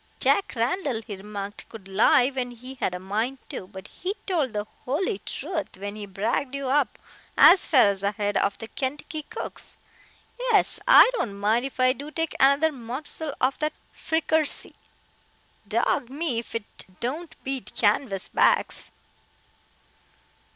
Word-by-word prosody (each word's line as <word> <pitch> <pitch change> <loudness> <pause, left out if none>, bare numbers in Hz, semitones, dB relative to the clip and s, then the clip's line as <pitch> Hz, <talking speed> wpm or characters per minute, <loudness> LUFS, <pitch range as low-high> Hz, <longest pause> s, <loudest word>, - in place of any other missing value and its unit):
"Jack 400 - +2
Randall," 245 - -1
he 210 - -6
remarked, 200 +1 -7
"could 215 -4 -11
lie 220 +6 +4
when 260 -2 -3
he 250 +2 -10
had 230 -8 -2
a - - -5
mind 220 +8 -2
to, 185 - -6
but 190 0 -10
he 380 +3 -4
told 320 - 0
the 210 -1 -3 0.2
holy 370 - -1
truth 320 - -5
when 200 +2 -6
he 210 -1 -7
bragged 225 +8 -1
you 275 -2 -3
up 275 -3 +2 0.4
as 380 - +8
far 255 -9 +6
ahead 200 +1 -2
of 200 0 +1
the 225 - -7
Kentucky 295 +6 -4
cooks. 450 +9 -8 0.6
Yes, - - +2
I - - +9
don't 205 - -3
mind 225 +5 +2
if 270 - -13
I 255 0 +5
do 285 +2 -8
take 325 +1 -2
another 280 +4 +5
mossel 280 +4 -5
of 260 +2 +1
that 305 0 -1 0.2
frickersee. 320 -1 0 0.9
Dog 240 - +1
me 280 -3 -1
if 230 - -9
it 225 -2 -5
don't 305 +8 -4
beat 270 -1 -5
canvas 205 -2 +1
backs." - - +2
255 Hz, 150 wpm, -25 LUFS, 210-300 Hz, 0.9 s, I